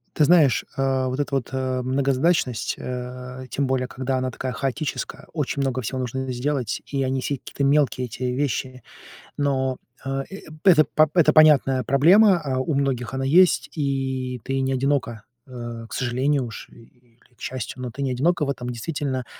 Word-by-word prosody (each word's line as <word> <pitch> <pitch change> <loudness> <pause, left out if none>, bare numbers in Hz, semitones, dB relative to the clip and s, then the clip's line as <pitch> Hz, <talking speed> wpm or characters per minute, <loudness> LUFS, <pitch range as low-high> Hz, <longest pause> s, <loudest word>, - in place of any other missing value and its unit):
Ты 150 - +3
знаешь, 155 -5 +4
а, 135 -1 +1
вот 130 +2 -3
эта 145 -1 -1
вот, 135 -4 -2
э, 130 -1 -1
многозадачность, 135 0 +1
э, 125 +1 -6
тем 135 +3 -1
более, 130 -1 0
когда 130 0 -2
она 130 0 -2
такая 130 +1 -4
хаотическая, 135 +5 -4
очень 145 -3 -2
много 130 -1 -1
всего 130 +4 -3
нужно 130 +1 -3
сделать, 125 -2 -2
и 135 -1 -1
они 130 0 -1
все 140 0 -2
какие-то 140 - -5
мелкие, 140 -2 +2
эти 120 +3 -7
вещи. 130 -1 -2 0.6
Но, 130 -2 0 0.3
э, 135 0 -2
э 195 - -8 0.2
это 170 -6 +6
п 155 +2 +3
это 155 -4 +4
понятная 140 -4 +5
проблема. 180 - +5
А, 135 -3 -2
у 145 +4 -1
многих 135 -3 -1
она 135 0 -2
есть, 175 +6 +4
и 130 -3 -2
ты 135 0 -2
не 135 0 0
одинока, 130 -5 -1 0.2
э, 120 -2 -7
к - - -9
сожалению 130 +2 0
уж, 115 - -9
или 120 0 -21 0.2
к - - -26
счастью, 130 0 -5
но 125 - -4
ты 140 +4 -5
не 135 - 0
одинока 150 +5 +1
в - - -4
этом. 125 -2 -5
Действительно, 130 +1 -3
130 Hz, 180 wpm, -23 LUFS, 125-140 Hz, 0.6 s, это